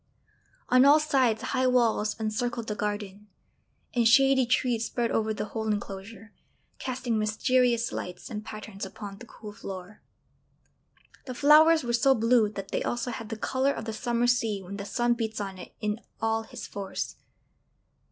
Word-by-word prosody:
On 255 Hz, +1 st, +6 dB
all 290 Hz, +3 st, +7 dB
sides 255 Hz, -7 st, +1 dB
high 255 Hz, 0 st, +1 dB
walls 230 Hz, -4 st, +2 dB
encircled 230 Hz, +2 st, -2 dB
the 215 Hz, -, -3 dB
garden, 205 Hz, -1 st, -4 dB, 0.7 s
and 235 Hz, -2 st, +3 dB
shady 265 Hz, +1 st, +5 dB
trees 240 Hz, -2 st, +1 dB
spread 235 Hz, -1 st, -1 dB
over 220 Hz, 0 st, +1 dB
the 215 Hz, -, -3 dB
whole 220 Hz, -1 st, -2 dB
enclosure, 205 Hz, +1 st, -5 dB, 0.5 s
casting 250 Hz, -3 st, -2 dB
mysterious 235 Hz, +2 st, +2 dB
lights 180 Hz, 0 st, -6 dB
and 215 Hz, -3 st, -6 dB
patterns 215 Hz, -2 st, -8 dB
upon 195 Hz, 0 st, -7 dB
the 245 Hz, -, -11 dB
cool 210 Hz, -2 st, -10 dB
floor. 195 Hz, 0 st, -9 dB, 1.3 s
The 255 Hz, -, -5 dB
flowers 310 Hz, +3 st, +6 dB
were 240 Hz, -1 st, -2 dB
so 265 Hz, +3 st, +4 dB
blue 230 Hz, -1 st, +3 dB
that 195 Hz, -2 st, -7 dB
they -, -, -1 dB
also 240 Hz, +1 st, -2 dB
had 225 Hz, -1 st, -7 dB
the 225 Hz, -, -4 dB
colour 265 Hz, +4 st, 0 dB
of 220 Hz, -, -6 dB
the 220 Hz, -, -4 dB
summer 235 Hz, +2 st, 0 dB
sea 230 Hz, -4 st, +1 dB
when 195 Hz, +2 st, -7 dB
the 200 Hz, -, -6 dB
sun 240 Hz, +3 st, +1 dB
beats 220 Hz, -2 st, -3 dB
on 195 Hz, -2 st, -5 dB
it -, -, -11 dB
in 210 Hz, +1 st, -2 dB, 0.2 s
all 225 Hz, 0 st, 0 dB
his -, -, -8 dB
force. 200 Hz, -1 st, -5 dB
225 Hz, 165 wpm, -27 LUFS, 210-245 Hz, 1.3 s, all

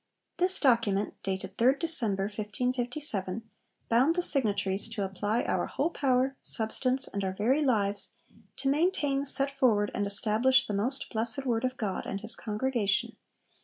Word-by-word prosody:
This 365 Hz, +1 st, +2 dB
document, 225 Hz, -7 st, +2 dB
dated 190 Hz, 0 st, -4 dB
3rd 255 Hz, +4 st, +4 dB
December 235 Hz, -, 0 dB
1557, 225 Hz, 0 st, -3 dB, 0.4 s
bound 255 Hz, +8 st, +3 dB
the 355 Hz, -, 0 dB
signatories 205 Hz, -, +1 dB
to 225 Hz, -3 st, -3 dB
'apply 205 Hz, +4 st, -1 dB
our -, -, -1 dB
whole 335 Hz, -, -1 dB
power, 265 Hz, -2 st, +1 dB
substance, 255 Hz, +4 st, +2 dB
and 200 Hz, 0 st, -4 dB
our 190 Hz, -1 st, -2 dB
very 240 Hz, +10 st, +1 dB
lives, 205 Hz, -7 st, 0 dB, 0.5 s
to 275 Hz, -, -3 dB
maintain, 285 Hz, -2 st, +1 dB
set 275 Hz, 0 st, -2 dB
forward, 210 Hz, -6 st, +2 dB
and 205 Hz, -, -1 dB
establish 235 Hz, +6 st, +3 dB
the 210 Hz, -, -4 dB
most 245 Hz, +7 st, -2 dB
blessed 225 Hz, +4 st, -1 dB
Word 235 Hz, -2 st, 0 dB
of 255 Hz, 0 st, -2 dB
God 200 Hz, -4 st, -3 dB
and 195 Hz, -, -4 dB
his 225 Hz, +2 st, 0 dB
congregation 215 Hz, -2 st, -1 dB
230 Hz, 150 wpm, -29 LUFS, 205-270 Hz, 0.5 s, 3rd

